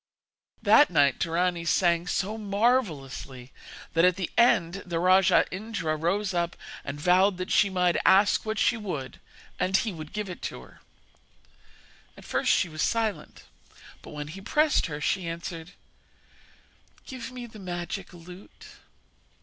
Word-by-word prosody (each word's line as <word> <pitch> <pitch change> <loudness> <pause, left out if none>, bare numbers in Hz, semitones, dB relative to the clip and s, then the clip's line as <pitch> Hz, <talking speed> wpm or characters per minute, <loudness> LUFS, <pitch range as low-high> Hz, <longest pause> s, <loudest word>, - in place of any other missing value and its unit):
That 295 - +6
night 145 -6 +3
Dorani 170 +1 0
sang 170 0 +1
so 205 +3 -1
marvellously 195 - -1 0.4
that 165 0 +3
at 180 -1 +4
the 185 -3 -4
end 195 -6 +3
the 175 -2 -4
rajah 185 +1 +4
Indra 185 -5 -3
rose 190 +6 -1
up 170 -1 -1 0.3
and 140 +1 -6
vowed 180 +4 +3
that 185 0 -5
she 200 - +4
might 180 -2 +1
ask 200 +2 +4
what 220 0 -3
she 235 - +2
would 180 -11 -6 0.4
and 185 +1 +2
he 220 -1 -2
would 155 -2 -9
give 210 -1 -4
it 180 - -8
to - - -6
her. - - -19 1.4
At - - -14
first - - 0
she 185 - +2
was 155 -2 -6
silent; 225 -2 -2 0.6
but, - - -12
when 150 0 -7
he 190 +5 -9
pressed 300 +5 +2
her, 150 -2 -6
she 180 +3 -1
answered: 165 +1 -6 1.3
'Give 260 -1 -8
me 250 -1 -7
the 220 -2 -13
magic 180 0 -5
lute.' 180 +2 -14
180 Hz, 150 wpm, -27 LUFS, 165-205 Hz, 1.4 s, That